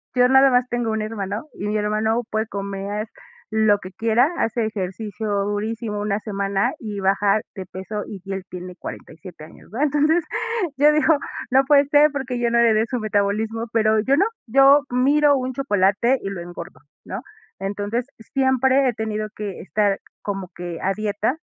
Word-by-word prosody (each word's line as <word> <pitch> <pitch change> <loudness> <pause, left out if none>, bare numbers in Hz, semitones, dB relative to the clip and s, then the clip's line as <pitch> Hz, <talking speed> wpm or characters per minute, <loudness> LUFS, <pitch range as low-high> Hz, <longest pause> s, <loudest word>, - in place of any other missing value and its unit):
yo 250 0 +5
nada 265 +1 +6
más 250 0 +3
tengo 240 -2 -1
un 220 0 -1
hermano, 215 +1 -4
y 205 - -5
mi 210 +1 0
hermano 215 +3 0
puede 220 +1 -1
comer 200 +1 -4 0.4
lo 215 -2 +3
que 185 - -9
quiera, 230 +7 +2
hace 225 0 0
ejercicio 210 +1 -5 0.2
durísimo 210 +1 -3
1 205 0 -1
semana, 200 +2 -1
y 210 -3 -5
bajar 195 +2 +2
de 190 - -6
peso, 190 +3 -6
y 195 -3 -9
él 190 -1 -3
tiene 180 0 -8
47 165 -2 -10
años, 160 - -17
¿verdad? 255 +8 +1
Entonces, 300 +4 +2 0.5
yo 295 +2 +6
digo: 305 +1 +4 0.3
"No 265 +2 +4
puede 280 0 +5
ser, 295 0 +5
porque 265 -3 -3
yo 235 -1 +1
no 235 - +3
heredé 225 -2 +4
su 245 +1 -3
metabolismo", 215 +2 0
pero, 220 -1 +3
yo 270 +6 +2
no 385 - +4 0.2
yo 275 +4 +6
miro 285 +4 +4
un 260 -1 -2
chocolate, 235 0 +2
y 195 - -4
lo 195 -3 -5
engordo, 175 0 -9 0.3
¿no? - - -6 0.4
Entonces 205 +5 -2
siempre, 265 +1 +2
he 245 - +1
tenido 215 -1 -3
que 205 -3 -5
estar, 200 0 0 0.2
como 195 -3 -4
que 175 -1 -6
a 195 +1 +1
dieta, 215 +6 -1
220 Hz, 175 wpm, -22 LUFS, 200-255 Hz, 0.5 s, nada